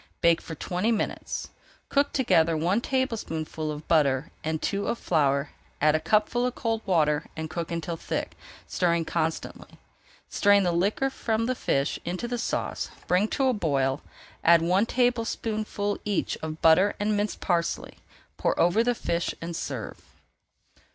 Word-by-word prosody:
Bake 170 -1 +4
for 160 - -7
twenty 180 +8 -1
minutes. 220 - -2 0.4
Cook 285 0 +2
together 165 - +3
one 180 +8 +1
tablespoonful 165 - -2
of 150 0 -8
butter 145 -3 +2
and 160 0 -1
two 200 +5 -1
of 235 - 0
flour, 140 -6 +1 0.3
add 155 +1 +4
a 155 - +2
cupful 215 +8 +2
of 250 0 -1
cold 225 -1 -1
water 155 -4 +2
and 160 0 -4
cook 170 0 -4
until 170 0 -3
thick, - - -4 0.3
stirring 170 -2 +1
constantly. 160 -1 -3 0.5
Strain 205 0 +4
the 180 - +2
liquor 200 +10 +1
from 225 -3 -1
the 255 - +1
fish 140 - 0
into 180 +7 -3
the 240 0 -3
sauce, - - -2 0.2
bring 185 +4 +2
to 270 - 0
the 260 - +3
boil, 140 - +1 0.5
[Page 170 0 +6
382] - - -1
add - - -1
one 190 +5 +3
tablespoonful 225 -4 -1
each 205 -3 -1
of 160 0 -6
butter 180 +5 +5
and 210 +1 +1
minced 205 0 -1
parsley, 170 -2 -1 0.4
pour - - 0
over 175 +7 +4
the 245 0 +1
fish 170 -5 -2
and 165 0 -5
serve. 130 -9 -5
175 Hz, 160 wpm, -27 LUFS, 160-220 Hz, 0.5 s, Page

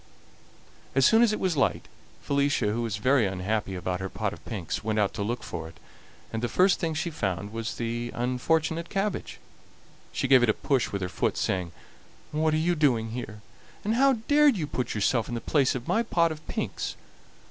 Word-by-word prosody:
As 135 -1 +5
soon 225 +1 +6
as 235 -3 +5
it 215 - -2
was 185 -3 0
light, 140 - +1 0.4
Felicia, 140 -6 +1
who 120 - -1
was 115 -3 -2
very 125 0 +3
unhappy 95 +1 -2
about 90 0 -2
her 95 0 -4
pot 105 +1 -2
of - - -12
pinks, 95 -3 -4
went 110 0 -1
out 105 -2 +2
to - - -4
look 120 +4 -2
for 80 - -5
it, 80 -2 -14 0.6
and 115 - -2
the 120 - -1
first 185 - +4
thing 160 -2 -1
she 160 +3 -2
found 100 - -3
was 115 0 -3
the 120 +1 -3
unfortunate 160 +7 0
cabbage. 195 0 -2 0.7
She - - -1
gave 130 -1 +7
it 120 - +3
a 110 - +3
push 135 -4 0
with 100 -2 -2
her - - -1
foot, 90 - -1
saying: 90 -3 -1 0.6
"What 155 0 +1
are - - +2
you 170 +3 +2
doing 125 -8 +2
here, 110 -3 -6 0.4
and 215 - 0
how 270 +3 +5
dared 290 -4 +5
you 160 - -1
put 130 -5 -3
yourself 110 +3 +1
in 120 - -3
the - - -2
place 135 +1 +2
of 125 -1 -5
my 225 - +2
pot 170 -7 +2
of 155 0 -9
pinks?" - - -3
125 Hz, 205 wpm, -27 LUFS, 105-160 Hz, 0.7 s, gave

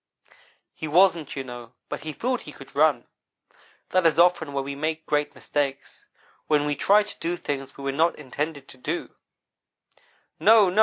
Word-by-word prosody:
"He 155 - -6
wasn't, 170 -1 +3
you 135 - -3
know, 120 -2 -9
but - - -4
he 155 +1 -5
thought 250 - -2
he 150 - -10
could 135 -1 -14
run. 145 -4 +3 0.8
That 185 -2 +4
is 160 - +2
often 170 -3 +4
where 140 -1 -2
we 140 +1 -5
make 155 +3 -3
great 150 0 0
mistakes 140 -2 -3 0.4
when 150 -1 +3
we 145 0 0
try 205 +8 +4
to 210 - -9
do 175 +1 -2
things 135 -3 -5
we 140 - -9
were 140 - 0
not 160 +5 +2
intended 145 +1 -4
to - - -12
do. 160 +6 -3 1.3
"'No 215 -4 +6
no!' 200 - 0
150 Hz, 175 wpm, -25 LUFS, 140-170 Hz, 1.3 s, No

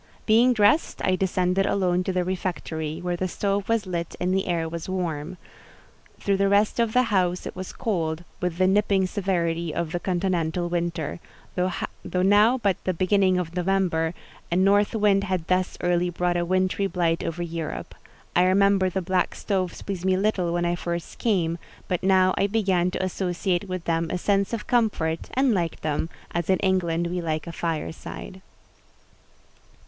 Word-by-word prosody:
Being 235 +3 +5
dressed, 215 +8 +3
I 185 - +3
descended 185 +1 +1
alone 180 -2 +1
to - - 0
the 180 -1 0
refectory, 170 -4 -3
where 175 0 -1
the 185 +2 -1
stove 200 +2 -1
was 225 -2 +1
lit 170 -2 -4
and 180 +1 0
the 190 0 0
air 170 -2 0
was 165 +2 -6
warm; 175 -2 -3 0.8
through 200 -1 +1
the 195 0 +2
rest 205 +3 +2
of 230 -2 +1
the 250 - +5
house 180 -2 +1
it - - -6
was 185 0 -6
cold, 165 -6 -2 0.2
with 180 -2 -1
the 185 - +3
nipping 195 0 +3
severity 170 -4 -1
of 165 0 -3
a 175 - 0
continental 175 -2 -1
winter: 170 -2 -2 0.4
though 180 0 -2
now 210 +6 +5
but 200 -6 0
the 185 - -1
beginning 185 +1 +3
of 175 -1 -3
November, 180 -3 +1 0.4
a - - +1
north 200 +3 +3
wind 205 -2 +3
had 185 -4 -2
thus 185 +1 0
early 175 0 +1
brought 175 0 0
a 175 0 0
wintry 185 +2 +1
blight 170 -3 0
over 170 +1 -3
Europe: 165 -2 -5 0.4
I 180 - +5
remember 195 0 +4
the 185 +1 -2
black 185 0 0
stoves 185 -4 -2
pleased 190 -3 -4
me 190 0 +2
little 190 -4 +1
when 175 0 0
I 175 - +1
first 170 -1 -4
came; 175 -7 +1 0.3
but 180 - -1
now 185 -1 +4
I 200 - +3
began 190 -4 +1
to 185 - -3
associate 185 0 -1
with 185 -2 -3
them 165 -1 0
a 180 - -1
sense 200 +1 +1
of 230 -2 -3
comfort, 205 -9 0
and 265 -2 +3
liked 170 -4 -2
them, 155 +1 -1 0.2
as 170 +1 -2
in 190 - +4
England 175 -3 +1
we 175 +1 -2
like 155 -2 -2
a 170 - -6
fireside. 165 +3 -5
185 Hz, 175 wpm, -25 LUFS, 170-195 Hz, 0.8 s, Being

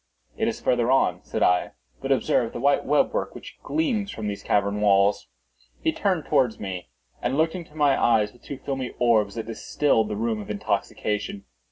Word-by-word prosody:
"It - - 0
is - - -2
farther 120 -1 +1
on," 90 -9 +2
said - - -2
I; 90 0 +2 0.3
"but - - -2
observe 115 -2 +2
the - - -5
white 140 +3 +2
web 150 - +2
work - - -2
which - - -11
gleams 250 -11 -1
from 110 - -6
these 100 -1 -4
cavern 100 0 +1
walls." 100 0 +3 0.5
He - - +1
turned - - 0
towards 125 -4 +2
me, 95 -9 -5 0.3
and 135 - -1
looked 160 +1 +2
into 170 -4 -8
my 145 -3 +3
eyes 110 -3 +3
with 120 - -21
two 140 - -7
filmy 135 -2 -4
orbs 110 -4 +2
that 115 -1 -4
distilled 115 0 0
the 105 - -2
rheum 110 0 -1
of 100 - -10
intoxication. 105 -1 -2
115 Hz, 190 wpm, -25 LUFS, 105-140 Hz, 0.5 s, walls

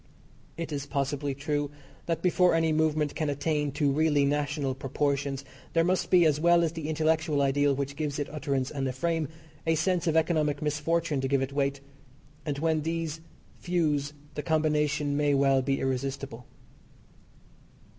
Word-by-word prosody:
It 165 -2 -4
is 145 -1 -3
possibly 140 0 -1
true 145 +1 -1 0.4
that 165 -1 -1
before 180 -1 +4
any 165 -1 +2
movement 155 -1 +1
can 155 -2 -1
attain 145 0 0
to 145 -1 +2
really 150 -1 +3
national 145 -1 0
proportions 140 0 -2 0.3
there 165 - +4
must 180 +2 +1
be, 175 -2 +6
as 150 -2 +3
well 170 +1 +5
as 165 - +1
the 160 -2 -5
intellectual 160 -1 +1
ideal 140 0 +2
which 140 0 -3
gives 150 -1 -2
it 145 - -2
utterance 140 -3 -2
and 135 -2 -2
a 130 - -2
frame, 165 +3 -1 0.4
a 165 - +4
sense 175 +1 0
of 160 0 +3
economic 155 -3 +1
misfortune 150 0 0
to 135 - 0
give 135 0 +2
it 135 +1 -5
weight, 140 -1 0 0.7
and 145 -2 -1
when 160 +1 +1
these 165 0 -3 0.4
fuse 150 -5 0 0.2
the - - -3
combination 150 -2 +1
may 145 -1 +2
well 135 -1 +4
be 135 +1 0
irresistible. 135 -1 -3
150 Hz, 165 wpm, -28 LUFS, 140-160 Hz, 0.7 s, be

